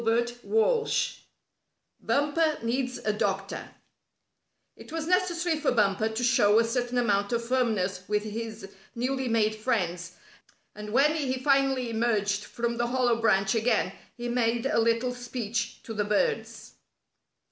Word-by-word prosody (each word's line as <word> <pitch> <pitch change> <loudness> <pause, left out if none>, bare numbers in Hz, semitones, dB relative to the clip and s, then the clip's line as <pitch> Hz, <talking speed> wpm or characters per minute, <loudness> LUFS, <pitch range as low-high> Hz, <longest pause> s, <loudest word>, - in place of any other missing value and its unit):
STORY 230 +1 +2
XIII 240 - 0 0.8
BUMPER 300 +2 +1
NEEDS 250 +2 -1
A 215 - +2
DOCTOR 195 -1 -2 1.1
It - - -13
was 325 -1 -3
necessary 350 -2 +1
for 300 - +1
Bumper 210 -2 +2
to 220 +2 -3
show 220 -4 +4
a 230 - +5
certain 245 +1 -1
amount 205 -3 +1
of 235 -1 -1
firmness 215 -7 0
with 210 0 +1
his 220 -1 -6 0.3
newly 260 +2 -1
made 220 -2 +2
friends, 180 -7 -2 0.6
and 210 0 -8
when 280 +6 +4
he 275 -5 -1
finally 270 -2 +2
emerged 210 -3 0
from 235 0 -3
the 240 0 0
hollow 245 -2 +1
branch 195 -3 +3
again 230 +1 +1 0.3
he 240 0 -4
made 235 -1 0
a 270 - +2
little 230 +2 +1
speech 235 -3 -4
to 225 - -7
the 210 -1 0
birds. 450 - -1
235 Hz, 140 wpm, -27 LUFS, 215-255 Hz, 1.1 s, a